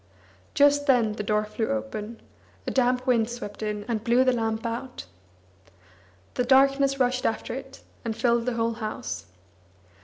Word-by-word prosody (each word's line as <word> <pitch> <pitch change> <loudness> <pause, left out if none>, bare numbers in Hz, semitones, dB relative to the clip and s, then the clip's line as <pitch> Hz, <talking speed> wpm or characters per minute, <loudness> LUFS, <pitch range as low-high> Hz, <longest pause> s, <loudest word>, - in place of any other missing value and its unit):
Just 285 0 +4
then 240 -5 +4
the 210 - -4
door 210 +1 +1
flew 220 +1 -3
open; 205 - -4 0.4
a - - -2
damp 250 -1 +2
wind 235 -3 +2
swept 230 -4 -7
in 210 -1 -3
and 225 -3 -2
blew 240 +3 +4
the 255 -1 +3
lamp 225 -1 -1
out. 235 - -5 1.3
The 250 - 0
darkness 275 +1 +4
rushed 250 0 +1
after 225 +1 -1
it, 265 +1 -8 0.2
and 225 -2 -3
filled 235 -1 +2
the 250 - +1
whole 230 0 0
house. 120 - -5
235 Hz, 155 wpm, -26 LUFS, 220-255 Hz, 1.3 s, Just